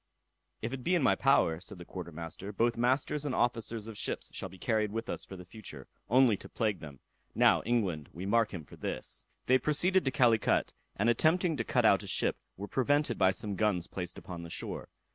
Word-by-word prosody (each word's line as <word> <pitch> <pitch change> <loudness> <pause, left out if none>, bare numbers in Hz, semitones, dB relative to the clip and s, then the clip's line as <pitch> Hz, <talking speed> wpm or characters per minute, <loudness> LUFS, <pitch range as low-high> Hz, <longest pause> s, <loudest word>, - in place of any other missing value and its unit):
"If 115 +3 -2
it 130 -2 -5
be 180 - +2
in 170 - +2
my - - +5
power," 135 -12 +3
said 95 +1 -8
the 90 - -10
quarter 90 -2 -7
master, 85 +5 -7
"both 115 +3 +1
masters 130 +4 +1
and 145 -3 -1
officers 115 -2 0
of 110 -2 -8
ships - - -3
shall 95 - -5
be 95 - -13
carried 110 +1 0
with 115 +1 -3
us - - -3
for 95 - -9
the 90 - -10
future, 90 - -10 0.2
only 125 -1 +5
to - - -11
plague 105 -5 -1
them. 70 -5 -10 0.4
Now, - - +5
England, 95 -11 0
we 90 +3 -7
mark 115 +2 +2
him 85 -5 -6
for - - -14
this." - - -5 0.2
They 130 +1 +4
proceeded 175 +7 +2
to - - +3
Calicut, 120 -5 +3 0.2
and 105 - +1
attempting 160 +8 +3
to 115 - 0
cut - - +1
out - - +5
a - - -9
ship, - - +1 0.2
were 100 +2 -5
prevented 140 +1 +1
by 95 - +6
some 100 +2 -2
guns 95 -4 +1
placed 90 -1 -5
upon 90 -2 -7
the 85 - -8
shore. - - -4
110 Hz, 220 wpm, -31 LUFS, 95-130 Hz, 0.4 s, by